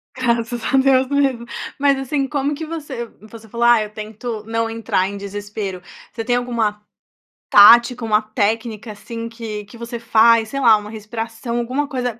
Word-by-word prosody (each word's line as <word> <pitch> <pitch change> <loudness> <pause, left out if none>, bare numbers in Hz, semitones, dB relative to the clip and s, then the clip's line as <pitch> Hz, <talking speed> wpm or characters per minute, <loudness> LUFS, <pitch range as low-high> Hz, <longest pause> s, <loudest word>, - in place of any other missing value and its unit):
Graças 235 -2 -1
a - - +5
Deus 265 -1 +4
mesmo. 275 -4 +1 0.3
Mas 280 -1 +3
assim, 270 +1 -1
como 285 0 -1
que 320 - -6
você 295 -7 -6 0.2
você 225 0 -12
falou: 235 +3 -1
"Ah, 240 -2 +6
eu 210 - -7
tento 215 +1 -6
não 225 0 -1
entrar 225 -4 -1
em 200 +1 -6
desespero.", 200 -1 -6 0.3
você 225 - -5
tem 245 0 +1
alguma 230 -4 -1 0.7
tática, 235 +3 +7
uma 215 -1 +2
técnica 220 +1 -2
assim, 230 +2 -7
que 225 -3 -7
que 220 +4 -14
você 235 0 -6
faz, 225 -1 +4
sei 275 - -4
lá, 235 -5 +6
uma 210 0 -8
respiração, 225 +2 -5
alguma 260 +5 -2
coisa 250 -4 -3
230 Hz, 170 wpm, -20 LUFS, 215-250 Hz, 0.7 s, tática